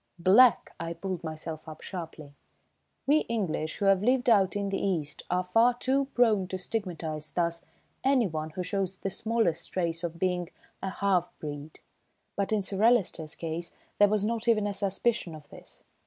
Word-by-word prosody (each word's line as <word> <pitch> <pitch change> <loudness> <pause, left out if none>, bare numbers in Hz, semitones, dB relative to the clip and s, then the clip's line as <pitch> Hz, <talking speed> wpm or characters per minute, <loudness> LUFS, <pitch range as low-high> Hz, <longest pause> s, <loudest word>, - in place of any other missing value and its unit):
Black! 200 +6 +5
I 165 0 -3
pulled 185 -1 -5
myself 160 0 -6
up 155 - -10
sharply. 160 -5 -8 0.7
We 295 +3 +5
English, 180 -8 -2
who 200 - -1
have 195 -1 +4
lived 245 +2 +3
out 195 -3 +4
in 200 -1 -1
the 195 - -2
East, 160 -7 -1
are 180 +1 +1
far 225 +7 +3
too 270 +3 +1
prone 215 -6 +3
to 185 - -4
stigmatise 170 -6 -4
thus 170 -1 -1 0.4
anyone 200 - +1
who 180 +4 -4
shows 190 +1 -2
the 195 +1 -4
smallest 225 -4 0
trace 170 -2 -2
of 170 -1 -4
being 180 -1 -1 0.3
a 190 - -2
"half 185 -2 0
breed"; 145 0 -8 0.5
but 200 0 -1
in 210 -2 +1
Sir 195 +1 -3
Alister's 195 -9 +2
case 165 +1 -4 0.3
there 205 0 +6
was 210 -1 +2
not 230 +1 -2
even 215 -3 +3
a 205 - -1
suspicion 195 -3 0
of 150 -2 -13
this. - - -14
185 Hz, 170 wpm, -28 LUFS, 165-215 Hz, 0.7 s, there